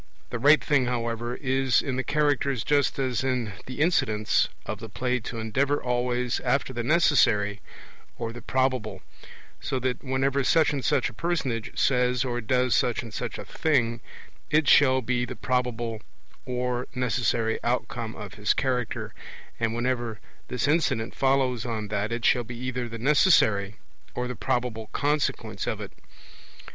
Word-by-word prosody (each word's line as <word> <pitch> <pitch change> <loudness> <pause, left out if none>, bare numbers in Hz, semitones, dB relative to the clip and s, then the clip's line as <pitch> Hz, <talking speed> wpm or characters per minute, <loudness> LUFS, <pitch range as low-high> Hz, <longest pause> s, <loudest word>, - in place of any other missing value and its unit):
The 120 - -3
right 145 +5 +6
thing, 140 -4 +2
however, 120 0 -2
is 130 -2 +2
in 135 -4 -2
the 130 - -1
Characters 140 -4 +1
just 145 -2 +2
as 130 -3 -1
in 125 -6 -1
the 130 +1 -7
incidents 110 -10 +2 0.2
of 105 - -4
the 115 -1 -8
play 125 +4 -1
to 115 0 -7
endeavour 135 +6 0
always 125 0 -1
after 130 +1 0
the 120 - -2
necessary 115 - +3 0.6
or 115 -1 -4
the 120 - -9
probable; 125 -6 -1 0.6
so 130 - -2
that 125 -1 -2
whenever 135 +1 0
such 155 +3 +3
and 140 -2 -2
such - - +2
a - - -17
personage 130 -6 -2
says 125 -1 +2
or 120 -1 -2
does 125 +2 +1
such 120 0 +1
and 115 -3 -10
such - - -4
a - - -7
thing, 120 -7 0 0.5
it 155 -1 +3
shall 130 -2 +5
be 125 +1 0
the - - -5
probable 120 -3 -2 0.5
or 125 0 -2
necessary 120 -2 0
outcome 120 -2 -2
of 105 -2 -8
his 105 +1 +1
character; 125 -3 -2 0.5
and 115 0 0
whenever 120 -2 -2 0.3
this 125 +2 -1
incident 145 -7 +1
follows 130 -3 +1
on 110 -4 -4
that, 105 +2 -1
it 115 0 -2
shall 125 - +4
be 120 +1 -8
either 125 -1 -3
the 115 - -6
necessary 110 - +3 0.4
or 125 0 -2
the 125 - -5
probable 115 -1 -2
consequence 145 0 -1
of - - -2
it. - - -7
125 Hz, 160 wpm, -26 LUFS, 115-130 Hz, 0.6 s, right